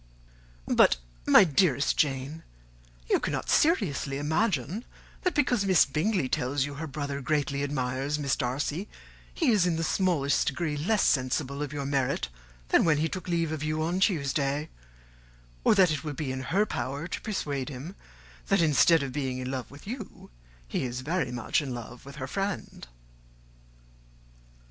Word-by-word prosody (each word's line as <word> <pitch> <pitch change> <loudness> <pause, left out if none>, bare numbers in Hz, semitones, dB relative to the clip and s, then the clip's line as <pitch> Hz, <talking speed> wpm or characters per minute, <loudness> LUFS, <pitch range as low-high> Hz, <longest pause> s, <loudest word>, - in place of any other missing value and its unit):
But, - - +4 0.3
my - - +8
dearest 150 -4 +2
Jane, 140 +2 -1 0.7
you - - +3
cannot - - -2
seriously 175 - +2
imagine 160 - 0 0.4
that, 365 - 0
because 250 -7 +2
Miss 190 -3 +5
Bingley 155 +3 0
tells 130 +2 0
you 145 - -6
her 155 +3 -5
brother 145 -1 -4
greatly 140 -1 0
admires 135 0 -1
Miss 140 -4 0
Darcy, 145 +9 -2 0.4
he 310 -7 +2
is 200 -5 +3
in 170 - +1
the 165 - -1
smallest 165 -5 +1
degree 150 +1 -1
less 190 +9 +1
sensible 140 +1 +1
of 145 -2 -3
your 145 -2 -4
merit 135 - 0 0.4
than - - +5
when 160 -3 +3
he 155 +2 +1
took 185 +3 -6
leave 170 -2 0
of 155 -2 -3
you 155 +1 -1
on 175 +3 0
Tuesday; 145 -5 0 0.9
or - - +5
that 185 -4 +5
it 150 -1 -2
will 150 -2 -4
be 135 -1 -3
in 130 0 -4
her 200 +4 +3
power 140 - -4
to - - -5
persuade 145 - -3
him 145 +8 -7 0.5
that, - - +3
instead 165 0 +5
of 135 -2 -5
being 130 -3 -2
in 130 0 -4
love 130 -2 -4
with 140 +1 -13
you, 220 - -8 0.4
he - - -2
is 125 0 -3
very 150 -2 -1
much 120 +5 0
in 135 -4 -4
love 120 +2 -9
with 140 - -9
her 130 - -4
friend." 195 - -4
145 Hz, 165 wpm, -28 LUFS, 135-175 Hz, 0.9 s, my